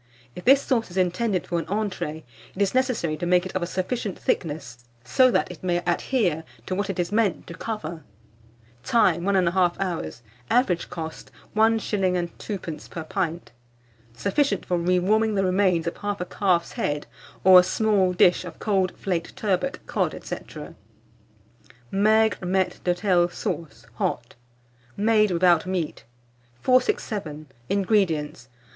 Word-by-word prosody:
If 180 - -9
this 275 +2 +6
sauce 235 -6 0
is 180 - -9
intended 185 +2 0
for 170 - -1
an - - -6
entrée, 190 -7 -3 0.3
it - - -9
is 195 - -1
necessary 250 - 0
to 175 - -3
make 180 0 +3
it 185 - -7
of 185 - 0
a 175 - -1
sufficient 190 +2 -3
thickness, 140 -7 -3 0.2
so 255 - +4
that 230 - +1
it 180 - -11
may 175 -1 +1
adhere 175 - 0 0.2
to 185 - -3
what 200 +1 -2
it 195 - -3
is 175 0 -1
meant 210 -4 +1
to 170 - -9
cover. 170 -5 -5 0.8
Time. 175 - +3
1 200 0 +2
1/2 180 -1 +2
hour. 180 - -2 0.4
Average 215 -9 +2
cost, 160 -2 -7 0.3
1s. 205 -5 +2
2d. 175 -7 -6
per 165 - -6
pint. 170 -2 -3 0.6
Sufficient 200 - 0
for 180 - 0
re 180 +2 +2
warming 215 +4 +2
the 195 - +2
remains 185 -3 +2
of 170 - -2
1/2 205 -3 -4
calf's 180 -4 +1
head, 145 0 -2 0.4
or 185 -1 +9
a - - +5
small 195 -1 +2
dish 180 0 +4
of 170 -3 -9
cold 190 -3 0
flaked 175 -4 -3
turbot, 215 +7 -1
cod, - - -1
&c. - - -4 1.6
MAIGRE 215 +1 +3
MAITRE 185 0 0
D'HOTEL 180 -1 +2
SAUCE 135 -9 -5
(HOT). 120 0 -2 0.6
(Made 215 0 +3
without 175 -1 +3
Meat.) 180 -10 -3 0.5
467. 190 - 0 0.2
INGREDIENTS. 175 - 0
185 Hz, 145 wpm, -24 LUFS, 170-205 Hz, 1.6 s, or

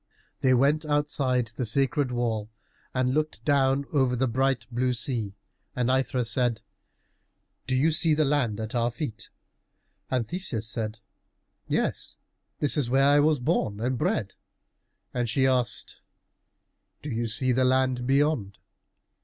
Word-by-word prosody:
They 130 -1 +4
went 145 +5 +3
outside 140 -5 0
the 125 - -2
sacred 135 +3 +1
wall 115 -3 -1 0.4
and 130 0 0
looked 155 +1 -2
down 140 -1 +2
over 130 -4 +2
the 130 +2 +1
bright 130 +2 0
blue 125 +1 0
sea, 115 -4 -2 0.4
and 125 0 +1
Aithra 130 -1 +1
said, 120 0 0 1.0
"Do 130 - 0
you 150 +5 +3
see 160 0 +3
the 155 0 +2
land 130 -7 0
at 110 0 -5
our 120 -1 +1
feet?" 120 -3 -6 0.8
And 125 -3 0
Theseus 155 - -3
said, 110 -1 -4 0.7
"Yes, - - -1 0.4
this 145 +1 -1
is 135 -5 0
where 135 +2 +4
I 145 +1 +5
was 150 +1 +3
born 105 -4 -1
and 125 +3 -1
bred." 150 - -1 0.8
And 120 -2 -1
she 130 +3 +2
asked, 125 -4 0 1.0
"Do 145 - -5
you 115 0 -1
see 125 +4 0
the 130 +1 +2
land 130 -1 +1
beyond?" 135 -8 +1
130 Hz, 145 wpm, -26 LUFS, 120-140 Hz, 1.0 s, I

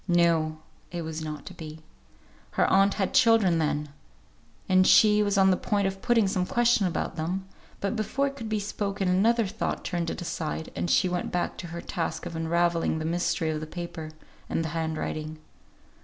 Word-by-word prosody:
No! 165 -3 +2 0.3
it 170 -1 -4
was 160 0 -5
not 155 -1 -6
to - - -8
be. 160 -2 -9 0.7
Her - - +3
aunt 195 +1 +4
had 195 -3 -1
children, 225 -8 +5
then; 150 -1 -1 0.8
and 185 0 +4
she 210 -1 +6
was 205 -1 +1
on 190 -1 +5
the - - +4
point 200 +1 0
of 195 0 -2
putting 240 -4 +3
some 190 -2 0
question 240 -4 +3
about 170 - -3
them, 180 +4 -3 0.3
but 200 +3 -1
before 235 +6 0
it 275 0 -3
could 230 -5 -6
be 215 -1 0
spoken 200 -1 -2
another 220 +6 +3
thought 215 +3 -3
turned 170 -2 -2
it - - -4
aside, 160 -2 -4
and 175 - -2
she 185 - +4
went 180 0 -2
back 175 - -1
to 175 - -6
her 170 +1 -6
task 165 -1 -3
of 170 -1 -6
unravelling 170 0 +1
the 155 - -3
mystery 165 -1 0
of 155 - -2
the 155 - -6
paper, 170 -1 -6 0.4
and 165 - 0
the - - -2
hand 160 0 -2
writing. 155 0 -4
175 Hz, 195 wpm, -27 LUFS, 160-200 Hz, 0.8 s, she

